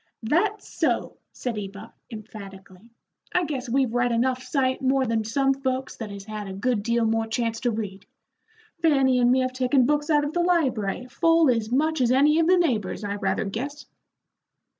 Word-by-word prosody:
"That's 395 - 0
so," - - -1
said 235 -4 -4
Eva, 200 +2 -9 0.2
emphatically. 200 -2 -11 0.5
"I 360 - +3
guess 270 -4 -4
we've 260 -1 +1
read 245 0 +1
enough 255 +2 +1
sight 260 0 -1
more 265 0 +2
than 225 -2 0
some 270 +5 +1
folks 265 -1 -3
that 225 -3 -6
has 200 -1 -8
had 215 -1 -6
a 190 - -6
good 215 +3 0
deal 235 +2 +1
more 225 0 0
chance 230 -1 -2
to 245 -2 0
read. 205 -3 -5 0.7
Fanny 270 -5 +3
and 245 0 +4
me 260 +1 +3
have 255 0 -1
taken 255 0 +2
books 295 +3 0
out 295 -2 +3
of 290 - -4
the 350 - 0
library 255 - 0
full 330 +3 +3
as 230 -2 -2
much 310 +3 +1
as 245 -1 +3
any 295 +4 +4
of 330 - +3
the 370 +1 +5
neighbors, 230 - 0
I 200 -1 -2
rather 190 0 -1
guess." 270 +9 -5
250 Hz, 185 wpm, -25 LUFS, 220-275 Hz, 0.7 s, the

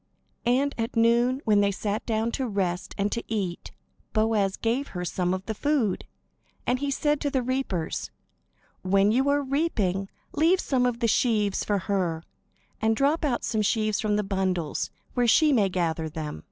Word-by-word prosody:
And 275 +4 +2
at 225 +1 -2
noon, 235 +3 +3
when 210 -2 +4
they 200 - +3
sat 205 +2 -2
down 225 0 0
to 265 0 -2
rest 185 -4 -2
and 200 +1 0
to 235 - -2
eat, 190 -6 -2 0.4
Boaz 215 -3 +1
gave 240 +5 -1
her 180 - -3
some 180 0 -1
of 185 +1 -3
the 220 - -2
food. 255 -4 0 0.6
And 250 +1 +1
he 285 +1 -1
said 295 +1 0
to 290 - 0
the 265 -2 0
reapers: 245 -10 -2 0.7
"When 195 +2 +3
you 265 +5 +2
are 285 0 +2
reaping, 215 - 0 0.2
leave 335 +5 +3
some 255 -6 +1
of 240 0 -3
the 230 - +3
sheaves 215 -4 +2
for 205 - 0
her; 185 -4 -1 0.6
and 220 0 +2
drop 290 +6 +1
out 265 -5 0
some 220 - 0
sheaves 215 0 +1
from 210 -1 +1
the 210 - +1
bundles, 190 -5 -1 0.2
where 245 -1 +2
she 300 +6 +5
may 205 -6 +3
gather 165 -3 -1
them." 150 - -5
220 Hz, 180 wpm, -26 LUFS, 195-255 Hz, 0.7 s, she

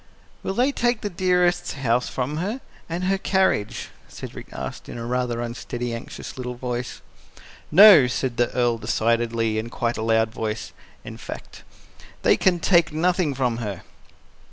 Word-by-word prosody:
"Will 190 - -3
they 255 +5 +3
take 240 -4 0
Dearest's 180 -1 +2
house 125 -3 0
from 135 +4 -3
her 205 +10 -2 0.3
and 170 +2 -3
her 195 +1 +1
carriage?" 190 - 0 0.2
Cedric - - -9
asked - - -7
in - - -7
a 115 - -5
rather 120 -1 -1
unsteady, 120 0 -4
anxious 115 +2 -8
little 125 -1 -4
voice. 125 0 -5 0.7
"NO!" 185 -6 +9
said 125 0 -2
the 120 - +2
Earl 120 -2 +1
decidedly 115 -1 0
in 115 +2 -5
quite 120 0 -2
a - - -3
loud 110 0 +2
voice, 110 -2 -4 0.3
in - - -8
fact. - - -9 0.6
"They - - +5
can 180 -2 +2
take 170 -1 +3
nothing 165 -1 +1
from 125 -3 0
her." 105 -6 -5
125 Hz, 155 wpm, -23 LUFS, 115-175 Hz, 0.7 s, NO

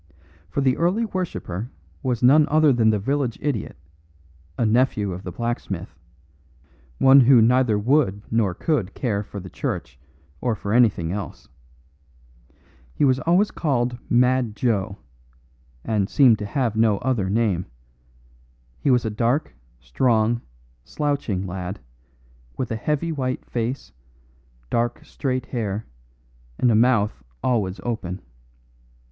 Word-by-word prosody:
For 140 - -1
the 130 -2 +2
early 185 +7 +1
worshipper 160 - -4 0.3
was 125 -2 -2
none 145 +4 +6
other 155 -2 +4
than 115 -2 +3
the 110 - +2
village 130 +3 -1
idiot, 135 - -3 0.8
a 120 - +1
nephew 110 -3 +2
of 90 - -7
the 90 - -7
blacksmith, 100 -6 -4 1.0
one 135 +1 +7
who 130 -1 +7
neither 120 -1 +3
would 105 -3 +1
nor 110 -5 +1
could 115 - -1
care 105 -6 -1
for 100 0 -8
the 95 - -9
church 65 0 -4 0.4
or 120 -3 0
for 100 +1 -4
anything 110 -9 +3
else. 100 0 -6 1.5
He - - +2
was 130 -1 +3
always 180 +7 +2
called 125 -5 -1
"Mad 125 -2 +2
Joe," 105 -3 -1 0.9
and 105 -3 0
seemed 125 -7 +5
to 105 - -4
have 120 -1 -1
no 110 -2 +3
other 120 -6 -1
name; 100 -4 0 1.1
he - - 0
was 125 -3 +3
a 110 - -1
dark, 115 - 0 0.3
strong, 110 - +1 0.4
slouching 140 - -2
lad, 90 +1 -5 0.8
with 125 - -3
a - - 0
heavy 150 +8 -1
white 130 -4 -3
face, 120 +3 -4 0.8
dark 120 0 -1
straight 130 -3 -3
hair, 110 -4 -3 0.7
and 125 - +3
a - - +3
mouth 110 -2 +2 0.2
always 105 -6 0
open. 100 -6 -3
115 Hz, 130 wpm, -23 LUFS, 100-130 Hz, 1.5 s, one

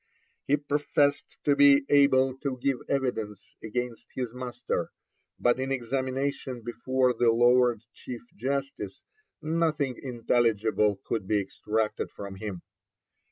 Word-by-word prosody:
He 145 - +4
professed 145 0 0
to 145 - +3
be 140 0 +6
able 135 -2 +4
to 135 -2 -3
give 130 0 0
evidence 110 -7 -2
against 120 +1 -4
his 125 -3 -3
master, 125 -1 -3 0.5
but 120 +1 +3
in 135 +1 -2
examination 130 0 -2
before 130 +2 +1
the 120 0 +3
Lord 120 -1 +4
Chief 120 -2 -8
Justice 135 -4 -3 0.4
nothing 155 -5 0
intelligible 115 -4 +1
could 105 -5 -2
be 105 0 +2
extracted 105 +2 -2
from 100 -1 -8
him. 95 -4 -6
125 Hz, 115 wpm, -28 LUFS, 115-140 Hz, 0.5 s, be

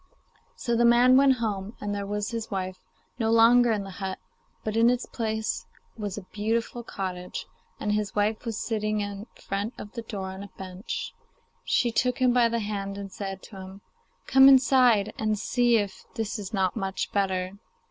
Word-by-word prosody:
So 235 - -1
the 235 - +3
man 240 +2 +6
went 270 0 +6
home, 210 -2 -3
and 205 0 -3
there 200 -1 -3
was 210 +2 -2
his 230 -1 -4
wife 185 -2 -3 0.4
no 225 -1 +1
longer 230 +1 +6
in 210 -2 0
the 195 - -8
hut, 190 -1 -3 0.5
but 215 0 -3
in 230 +1 +5
its 250 0 0
place 220 -2 -3 0.3
was 205 -3 -4
a 200 - -7
beautiful 225 +3 -1
cottage, 185 -5 -5 0.3
and 210 - -1
his 210 0 -1
wife 210 +1 +1
was 225 -3 -3
sitting 215 -1 -1
in 205 +1 -5
front 205 +4 -4
of 205 - -8
the 235 - -5
door 200 -4 -5
on 190 +1 -8
a 200 - -8
bench. 185 +1 -5 0.5
She 240 - +2
took 250 +3 +1
him 255 -2 +3
by 240 -2 +4
the 230 0 -1
hand 200 -1 -4
and 200 -1 -7
said 195 -1 -6
to 200 - -11
him, 190 +1 -10 0.4
'Come 265 0 +8
inside, 250 -6 +5
and 215 -1 +1
see 240 +2 +2
if 200 -3 -3
this 220 0 -2
is 200 -1 -6
not 190 -4 0
much 195 0 -3
better. 190 -1 -1
215 Hz, 190 wpm, -27 LUFS, 195-235 Hz, 0.5 s, Come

